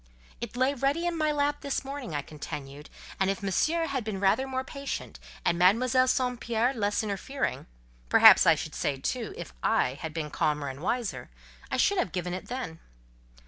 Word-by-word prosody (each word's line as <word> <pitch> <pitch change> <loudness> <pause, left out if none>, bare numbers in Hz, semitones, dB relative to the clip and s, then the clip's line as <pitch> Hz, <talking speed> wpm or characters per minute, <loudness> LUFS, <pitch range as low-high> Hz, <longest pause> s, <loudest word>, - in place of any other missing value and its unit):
"It 235 0 -6
lay 260 +2 +3
ready 280 +5 0
in 345 -1 0
my 310 -2 +1
lap 290 0 0
this 280 -1 -2
morning," 270 - -5
I 145 - -2
continued; 145 -1 -8 0.3
"and 190 0 +2
if 195 +1 -2
Monsieur 315 - +1
had 275 -5 -2
been 210 -3 -4
rather 200 +7 +2
more 260 0 -2
patient, 275 +1 -6 0.3
and 170 - +2
Mademoiselle 255 +8 +4
St. 250 -2 +1
Pierre 235 +2 +1
less 205 -2 0
interfering—perhaps - - +3
I - - +7
should - - -6
say, - - -1
too, - - -3
if - - -8
I 130 +3 +1
had 160 - -4
been 155 -2 -4
calmer 150 -4 0
and 135 +2 -8
wiser—I 235 +4 -4
should 405 -2 +3
have - - 0
given 180 -1 -2
it 185 - -6
then." 245 -11 -5
230 Hz, 180 wpm, -28 LUFS, 165-270 Hz, 0.3 s, I